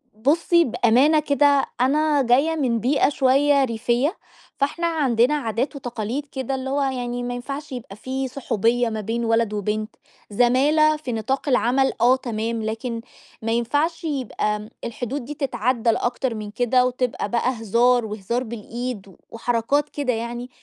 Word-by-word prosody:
بُصي 330 +9 +3
بأمانة 255 +4 +3
كده، 285 -1 +3 0.2
أنا 295 +2 +3
جايّة 270 +6 +3
من 250 -7 0
بيئة 270 +7 +2
شويّة 275 +1 +3
ريفية، 245 - 0 0.4
فإحنا 310 +5 0
عندنا 270 -5 +2
عادات 255 0 -2
وتقاليد 245 +1 -4
كده، 265 -1 -4
اللي 265 0 -4
هو 280 +1 0
يعني 245 -2 -2
ما 245 0 -3
ينفعش 275 +4 -6
يبقى 240 -6 -7
في 260 +4 -3
صحوبية 240 -2 0
ما 220 -1 -3
بين 230 +3 -2
ولد 225 -1 +1
وبنت، 210 +1 -3 0.3
زمالة 280 +8 +3
في 300 -5 -6
نطاق 265 +6 -2
العمل، 260 +1 +2
آه 250 +2 +6
تمام، 230 -2 -3
لكن 230 +2 -3 0.4
ما 225 0 -2
ينفعش 290 +9 0
يبقى، 260 -8 -1
آمم، 210 0 -8
الحدود 245 +3 -4
دي 295 - -6
تتعدى 250 -4 0
أكتر 240 +1 0
من 210 -1 -6
كده 250 +3 +2
وتبقى 250 -4 -2
بقى 240 +3 +1
هزار 235 +2 +3
وهزار 215 +3 -3
بالإيد 235 -1 -6
و 190 - -16
وحركات 245 +5 0
كده 280 -4 -1
يعني، 235 +2 -5
245 Hz, 150 wpm, -23 LUFS, 230-275 Hz, 0.4 s, آه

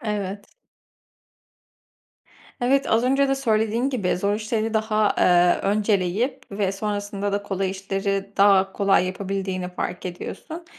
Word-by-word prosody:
Evet. 205 -3 -4 2.1
Evet, 270 +3 +2
az 225 +1 +3
önce 275 +2 +3
de 270 - +2
söylediğin 230 0 0
gibi, 205 -10 0
zor 200 +3 0
işleri 220 +1 -2
daha, 215 -1 +1
eee, 175 0 +4
önceleyip 210 +4 0
ve 195 -1 -1
sonrasında 205 0 -3
da 200 0 -1
kolay 195 -1 -2
işleri 195 +1 -3
daha 195 -1 +5
kolay 195 -2 +2
yapabildiğini 190 -1 -3
fark 180 0 -5
ediyorsun. 315 - -7
205 Hz, 120 wpm, -23 LUFS, 195-220 Hz, 2.1 s, daha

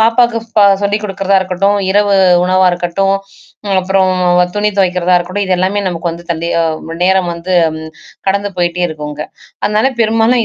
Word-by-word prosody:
பாப்பாக்கு 230 +1 +3 0.2
பா 210 - +6 0.2
சொல்லிக் 205 +1 0
கொடுக்கிறதா 195 -1 0
இருக்கட்டும், 190 +2 0
இரவு 205 0 +2 0.3
உணவா 185 +1 +3
இருக்கட்டும், 180 +3 0 0.5
ம் 195 -1 0
அப்பறம் 185 0 +1 0.4
துணி 210 0 +1
துவைக்கிறதா 180 -2 +1
இருக்கட்டும், 185 +3 -3
இதெல்லாமே 185 +2 0
நமக்கு 170 -1 -3
வந்து, 170 +1 -9
தன் 165 -1 -2 0.2
அ - - +2 0.3
ம் 165 - -6
நேரம் 190 -1 +2
வந்து 170 +2 -5 0.2
ம் 160 0 -8 0.4
கடந்து 200 +1 0
போய்ட்டே 175 0 0
இருக்கும் 150 -2 -6
அங்க. 150 +1 -6 0.4
அதனால 210 +5 +1
பெரும்பாலும் 225 +2 +2
190 Hz, 160 wpm, -13 LUFS, 175-205 Hz, 0.5 s, பா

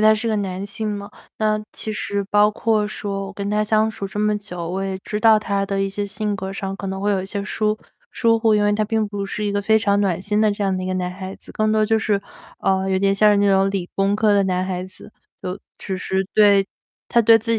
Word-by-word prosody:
他 215 0 +6
是 215 +2 -2
个 220 - +1
男 190 -1 -3
性 215 +2 -4
嘛。 205 -1 -5 0.3
那 215 -1 +1
其 220 - -4
实 200 -1 -1
包 210 0 +5
括 215 0 +1
说 200 -2 -4
我 195 - -8
跟 200 0 -4
他 210 0 +1
相 215 +1 +2
处 200 -2 -5
这 205 +2 -4
么 210 0 +2
久， 180 -4 -6
我 190 +2 -2
也 190 -1 -3
知 210 - -3
道 220 0 +6
他 200 -2 -1
的 195 0 -1
一 195 - 0
些 205 +1 -3
性 210 +1 -2
格 190 0 -5
上 195 0 -4
可 195 - -6
能 190 0 -4
会 205 +1 +1
有 195 -2 +1
一 185 - -6
些 200 +1 -3
疏 215 +1 0 0.4
疏 230 0 +3
忽， 220 -1 +3
因 210 - +3
为 205 0 +3
他 215 +1 +1
并 220 0 0
不 200 -1 -4
是 210 +2 -3
一 205 - 0
个 205 0 0
非 220 +2 +3
常 205 -2 +2
暖 185 -3 0
心 210 +2 0
的 215 -1 +3
这 205 - -4
样 195 -1 +1
的 185 - -3
一 - - -4
个 185 - -1
男 180 -1 -2
孩 190 +1 -7
子， - - -14
更 215 0 0
多 215 0 +3
就 220 +1 +2
是 205 -2 0 0.4
啊， 190 0 +1
有 190 - +1
点 195 +1 +2
像 210 +1 +5
是 205 - +3
那 200 0 +3
种， 195 0 +4
理 195 -3 -3
工 195 +1 +2
科 215 0 +3
的 200 -1 +3
男 185 -1 0
孩 185 -1 -3
子。 185 +2 -13 0.3
就 185 +1 -4 0.2
其 190 - -4
实 190 +1 -1
对， 200 -2 +5 0.4
他 235 - +4
对 225 0 +6
自 230 +1 -2
205 Hz, 295 characters per minute, -21 LUFS, 195-215 Hz, 0.4 s, 他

